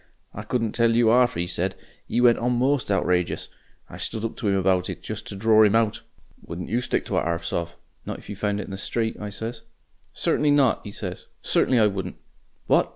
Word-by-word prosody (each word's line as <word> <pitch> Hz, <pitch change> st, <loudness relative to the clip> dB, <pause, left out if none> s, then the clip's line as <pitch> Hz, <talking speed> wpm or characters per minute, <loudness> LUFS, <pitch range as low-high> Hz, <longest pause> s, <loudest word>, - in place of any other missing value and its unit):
I 105 Hz, -, -6 dB
couldn't 115 Hz, 0 st, -1 dB
tell 115 Hz, -1 st, +2 dB
you 115 Hz, -1 st, +5 dB
'ARF 125 Hz, +1 st, +4 dB
'e 85 Hz, -, 0 dB
said. 90 Hz, +2 st, -2 dB, 0.3 s
'E 120 Hz, -, +1 dB
went 120 Hz, -1 st, +5 dB
on 125 Hz, +1 st, +1 dB
most 130 Hz, 0 st, +1 dB
outrageous. 90 Hz, -3 st, 0 dB, 0.4 s
I -, -, -10 dB
stood 110 Hz, 0 st, -3 dB
up 115 Hz, -, -4 dB
to 110 Hz, -, -1 dB
'im 100 Hz, -, +2 dB
about 95 Hz, -1 st, +2 dB
it, -, -, -7 dB
just -, -, -6 dB
to -, -, -5 dB
dror 110 Hz, +2 st, +5 dB
'im 105 Hz, 0 st, +4 dB
out. 115 Hz, -2 st, +2 dB, 0.4 s
'Wouldn't 85 Hz, +1 st, -6 dB
you 120 Hz, +4 st, +1 dB
stick -, -, -1 dB
to -, -, -1 dB
a -, -, +3 dB
'arf 85 Hz, 0 st, -2 dB
sov', 85 Hz, 0 st, -3 dB, 0.3 s
not -, -, -5 dB
if -, -, -14 dB
you 105 Hz, -, -6 dB
found 105 Hz, 0 st, -1 dB
it -, -, -3 dB
in -, -, -10 dB
the 95 Hz, -, -5 dB
street?' 110 Hz, +3 st, -2 dB
I 105 Hz, -, -5 dB
says. 115 Hz, +3 st, -5 dB, 0.5 s
'Certainly 150 Hz, -, +1 dB
not,' 135 Hz, -4 st, +3 dB
'e 105 Hz, -, -7 dB
says; 90 Hz, -3 st, -6 dB, 0.2 s
'certainly 130 Hz, -, +2 dB
I 110 Hz, -, +5 dB
wouldn't.' 95 Hz, -2 st, -2 dB, 0.5 s
'What! -, -, +3 dB
105 Hz, 225 wpm, -24 LUFS, 95-115 Hz, 0.5 s, you